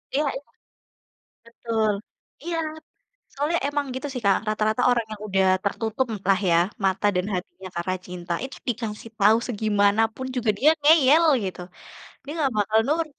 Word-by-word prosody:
Iya 300 +2 +2
iya. 285 - -14 1.0
Betul, 230 -2 -1 0.5
iya. 340 -1 -2 0.7
Soalnya 300 +5 0
emang 290 -1 -1
gitu 260 +3 -4
sih 250 -3 -5
Kak, 195 -1 +5
rata-rata 215 +2 0
orang 235 -2 +1
yang 210 - -8
sudah 195 -2 +1 0.2
tertutup, 220 +4 -1
m - - -9
lah 195 +1 +4
ya, 170 - +5 0.3
mata 195 +2 +1
dan 180 +1 0
hatinya 185 +1 -6
karena 180 +2 -1
cinta. 175 -1 -6
Itu 265 - -8
dikasih 225 -2 -4
tahu 210 +2 +5
segimanapun 220 +2 +1
juga 235 -3 +1
dia 300 +4 +5
ngeyel, 305 +1 +6 0.2
gitu. 185 -1 -5 0.6
Dia 285 - -8
enggak 280 -4 +1
bakal 215 +1 +2
nurut. 320 +2 +1
220 Hz, 155 wpm, -24 LUFS, 200-270 Hz, 1.0 s, ngeyel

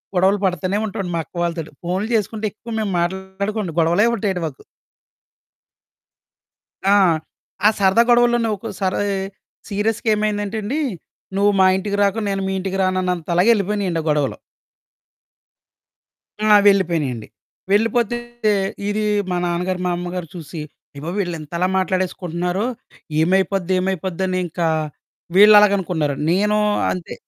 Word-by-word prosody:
గొడవలు 190 +3 +3
పడతానే 185 +1 0
ఉంటావండి 190 -3 -4
మా - - 0
అక్క - - -31
వాళ్ళతోటి. 165 -2 -3
ఫోన్లు 185 +6 -2
చేసుకుంటే 215 +1 -1
ఎక్కువ 230 +2 -11
మేము 210 -2 -1
మాట్లాడుకోవండి, 190 +1 -3
గొడవలే 175 +8 +3
ఉంటాయండి 190 -6 -2
మాకు. 140 - -11 2.2
ఆ! 200 +1 +5 0.7
ఆ - - +9
సరదా 195 +3 +4
గొడవల్లోనే 240 -1 +4
ఒక్కోసారీ 195 -3 -3 0.7
సీరియస్‌గ 215 +3 -1
ఏమైందంటెండి, 210 +5 -2 0.6
నువ్వు 200 +1 +4
మా 190 - +6
ఇంటికి 200 +1 -2
రాకు, 200 +2 +1
నేను 195 -1 -1
మీ - - -1
ఇంటికి 190 0 -3
రానన్నంతలాగెళ్ళిపోయినియండి 185 +1 +1
ఆ - - -9
గొడవలు. 150 -2 0 2.1
ఆ! - - +3 0.2
వెళ్ళిపోయినియండి. 160 - +1 0.4
వెళ్ళిపోతే 230 +2 +2 0.7
ఇదీ 210 +1 -1 0.3
మా 180 - 0
నాన్నగారు, 180 +1 -1
మా 180 - +1
అమ్మగారు 175 0 -4
చూసి 165 -1 -7 0.4
ఏవే, 160 +4 -5
వీళ్ళింతలా 170 -2 -2
మాట్లాడేసుకుంటన్నారో, 185 +1 -1 0.5
ఏమైపోద్ది, 190 +1 +1
ఏమైపోద్దనింకా 185 -2 -1 0.7
వీళ్ళలాగనుకున్నారండి. 195 -8 +5
నేనూ 210 +4 +2 0.3
అంతే 180 -2 -6
190 Hz, 105 wpm, -20 LUFS, 175-205 Hz, 2.2 s, ఆ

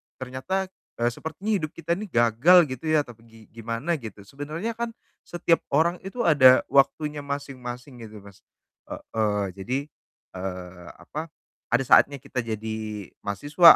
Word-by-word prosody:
ternyata, 130 +10 -3 0.3
eee, 120 - +4
sepertinya 160 - -5
hidup 155 -1 -4
kita 170 0 -4
ini 210 +1 -5
gagal" 120 - +6
gitu 130 +5 -5
ya 155 -2 +3
tapi 115 -3 -14
gi 115 0 -17
gimana, 115 +8 -2
gitu. 105 -4 -9
Sebenernya 155 - -5
kan 235 -1 -3 0.3
setiap 170 -1 +2 0.2
orang 170 +3 +3
itu 235 +5 -3
ada 130 -5 +7
waktunya 145 +2 +3
masing-masing 135 -3 -6
gitu, 105 -2 -12
Mas. 100 -2 -15 0.5
Heeh, 105 -3 -1
jadi, 125 +7 -1 0.6
eee, 90 -1 -6
apa, 155 +2 -6 0.4
ada 125 +2 +3
saatnya 140 +1 +5
kita 130 - -4
jadi 110 -2 -4 0.2
mahasiswa, 145 - +7
130 Hz, 140 wpm, -25 LUFS, 110-160 Hz, 0.6 s, ada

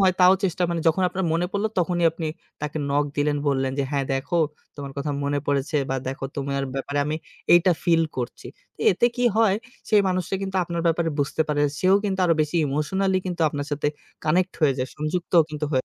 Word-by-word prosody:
হয় 185 -2 +4
তাও 180 +1 +8
চেষ্টা, 180 -1 0
মানে 170 -1 -1
যখন 165 +4 +1
আপনার 190 +1 -3
মনে 170 +2 +1
পড়লো 205 +2 0
তখনই 175 0 +1
আপনি 165 -1 -4 0.4
তাকে 150 +1 -3
নক 145 +1 +2
দিলেন, 145 0 +1
বললেন 135 -1 0
যে - - +2
হ্যাঁ, 140 -2 0
দেখো 135 +6 -1 0.4
তোমার 140 -2 -6
কথা 140 +1 -2
মনে 145 0 0
পড়েছে 140 +2 0
বা 135 - 0
দেখো 135 0 -5
তোমার 140 0 -2
ব্যাপারে 140 +1 -2
আমি 155 +1 -1 0.4
এইটা 175 +1 +5
ফিল 165 -1 +4
করছি। 125 -2 -5 0.5
এতে 210 +6 +3
কি 245 - 0
হয় 220 -3 +4 0.3
সেই 210 -2 +5
মানুষটা 185 0 -1
কিন্তু 190 0 -3
আপনার 170 0 -3
ব্যাপারে 165 0 +1
বুঝতে 145 +2 +1
পারে। 145 -1 +1 0.2
সেও 185 +1 +5
কিন্তু 195 -2 -1
আরো 170 -2 +4
বেশি 155 +2 0
ইমোশনালি 185 +7 0
কিন্তু 175 -2 -4
আপনার 145 -1 -4
সাথে 145 0 0 0.4
কানেক্ট 180 +4 +2
হয়ে 145 -4 +4
যায়। 130 0 -1
সংযুক্ত 155 +4 -3 0.2
কিন্তু 150 -1 -4
হয়ে 130 -2 +1
160 Hz, 200 wpm, -24 LUFS, 145-180 Hz, 0.5 s, তাও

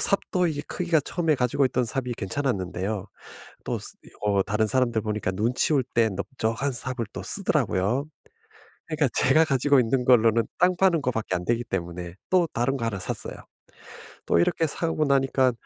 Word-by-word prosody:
삽도 185 -2 +2
이게 145 -2 -3
크기가 170 -3 +1
처음에 160 +1 0
가지고 125 +2 +1
있던 125 -1 0
삽이 125 +2 -3
괜찮았는데요. 100 -3 -2 0.6
또 - - -2
스 - - -7
이 - - -14
어 100 -2 +2
다른 105 +2 0
사람들 120 -2 +1
보니까 105 -3 -2
눈 110 +6 0
치울 140 -2 +2
때 115 -1 +4
넓적한 115 +6 -2
삽을 125 -1 -3
또 - - -6
쓰더라고요. 105 +10 0 0.8
그러니까 155 -4 +1
제가 155 +5 +4
가지고 140 -1 +3
있는 125 +1 +1
걸로는 115 -2 +5 0.2
땅 180 +1 +4
파는 175 -5 +3
것 130 - 0
밖에 110 -5 -2
안 90 0 -3
되기 120 0 0
때문에 85 -4 -5 0.2
또 180 -2 +3
다른 125 +4 0
거 115 - -3
하나 100 -4 -2
샀어요. - - -4 0.9
또 - - +3
이렇게 160 - +2
사고 160 0 -1
나니까 135 -2 +2
125 Hz, 360 characters per minute, -25 LUFS, 110-140 Hz, 0.9 s, 걸로는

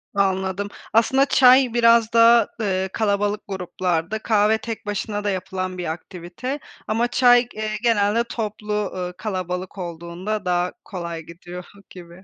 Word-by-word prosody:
Anladım. 190 0 0 0.3
Aslında 265 +5 +4
çay 255 -2 +5
biraz 230 -1 +4
daha, 230 0 +6
eee, 190 -3 -1
kalabalık 205 -1 0
gruplarda; 180 0 -2
kahve 215 0 +2
tek 225 0 -7
başına 205 0 -3
da 205 - 0
yapılan 185 -1 -3
bir 175 -3 -3
aktivite 180 - -6 0.3
ama 230 +2 +1
çay, 245 0 +4
eee, 215 0 -3
genelde 225 0 +2
toplu, 210 -3 -3
eee, 180 -1 -4
kalabalık 185 -2 -4
olduğunda 175 +4 -5
daha 180 0 0
kolay 170 -3 -6
gidiyor 175 +2 -10 0.2
gibi. 175 +1 -13
205 Hz, 130 wpm, -22 LUFS, 180-225 Hz, 0.3 s, daha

